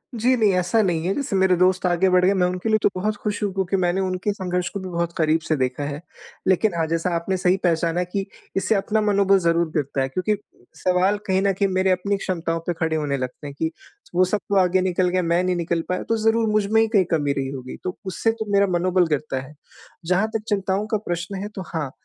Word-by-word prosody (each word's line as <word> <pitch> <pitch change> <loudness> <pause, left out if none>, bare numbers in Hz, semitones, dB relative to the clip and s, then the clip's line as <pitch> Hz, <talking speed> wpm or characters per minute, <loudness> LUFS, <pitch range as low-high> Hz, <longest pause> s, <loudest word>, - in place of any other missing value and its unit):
जी, 245 +3 +3
नहीं 215 -4 +3
ऐसा 180 +5 +2
नहीं 170 -4 0
है। 190 - +1
जैसे 275 -8 -2
मेरे 190 -1 +4
दोस्त 185 +1 +2
आगे 180 +1 +3
बढ़ 180 0 +4
गए 195 - +4
मैं 185 -2 +2
उनके 180 +4 -3
लिए 215 - +4
तो - - +5
बहुत 210 +3 -1
ख़ुश 210 -1 -2
हूँ 205 - 0
क्योंकि 190 0 -1
मैंने 180 +1 +1
उनके 185 +2 -1
संघर्ष 180 -2 -2
को 200 - -5
भी 185 - -6
बहुत 170 -1 -2
क़रीब 160 0 +2
से 155 - +2
देखा 130 +1 -1
है। 145 +1 -4 0.5
लेकिन 190 +2 +3
हाँ, 165 - +1
जैसा 165 +2 0
आपने 185 +3 -1
सही 180 0 +2
पहचाना 170 0 +1
कि 195 +2 -3 0.3
इससे 195 +3 +1
अपना 215 +2 +1
मनोबल 200 -2 +3
ज़रूर 170 -1 +1
गिरता 140 -3 -1
है 135 - -1
क्योंकि 185 +8 0 0.4
सवाल 185 +3 +2
कहीं 190 0 +2
न 200 0 +2
कहीं 195 +1 +1
मेरी 185 0 +2
अपनी 190 +2 +1
क्षमताओं 165 -3 -2
पे 175 - +2
खड़े 160 -1 0
होने 145 -3 -1
लगते 130 +3 -5
हैं 140 - -7
कि, 160 0 0 0.4
वो 185 +1 +5
सब 205 +3 0
तो 200 - +1
आगे 185 0 +3
निकल 185 0 +1
गए, 185 +1 +1
मैं 170 +1 +1
नहीं 180 -1 +1
निकल 170 -1 -1
पाया। 180 0 -1
तो 225 - +2
ज़रूर 225 0 +3
मुझ 210 -1 +2
में 220 0 +5
ही 225 - +3
कहीं 200 -5 +3
कमी 145 -3 +1
रही 135 -1 -2
होगी, 130 -2 -7
तो 185 - -4
उससे 190 +5 0
तो 225 -1 -5
मेरा 200 0 +4
मनोबल 180 0 +2
गिरता 150 -3 -1
है। 135 +3 -12 0.5
जहाँ 185 +5 +2
तक 215 - -1
चिंताओं 195 0 0
का 220 - 0
प्रश्न 175 +3 -3
है - - -3
तो 190 - -4
हाँ, 150 -5 -2
185 Hz, 245 wpm, -23 LUFS, 170-200 Hz, 0.5 s, तो